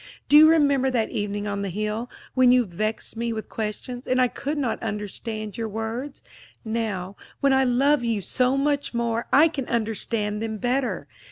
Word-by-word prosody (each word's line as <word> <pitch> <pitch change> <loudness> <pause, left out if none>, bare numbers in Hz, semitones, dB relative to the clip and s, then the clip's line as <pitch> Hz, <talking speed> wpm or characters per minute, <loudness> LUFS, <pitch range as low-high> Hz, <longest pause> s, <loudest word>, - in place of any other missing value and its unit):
Do 295 - +4
you 310 +1 +9
remember 280 -4 +3
that 235 -4 0
evening 205 0 -2
on 200 -1 -2
the 200 - -2
hill, 215 +5 -3 0.2
when 255 -1 +5
you 250 -1 +4
vexed 215 +6 -3
me 235 +1 -2
with 220 -1 -5
questions, 230 +3 -5
and 255 0 +2
I 250 -1 +4
could 290 +5 -4
not 255 -6 -1
understand 215 +1 -5
your 225 -1 -2
words? 225 +6 -5 0.4
Now, 210 -4 -3 0.2
when 275 -1 +3
I 265 0 +4
love 270 +3 +3
you 230 -3 0
so 250 +7 +1
much 285 -2 0
more, 235 0 -1
I 305 +4 +7
can 280 -6 -4
understand 215 -2 -2
them 220 -1 -3
better. 250 +3 -1
235 Hz, 180 wpm, -24 LUFS, 215-265 Hz, 0.4 s, you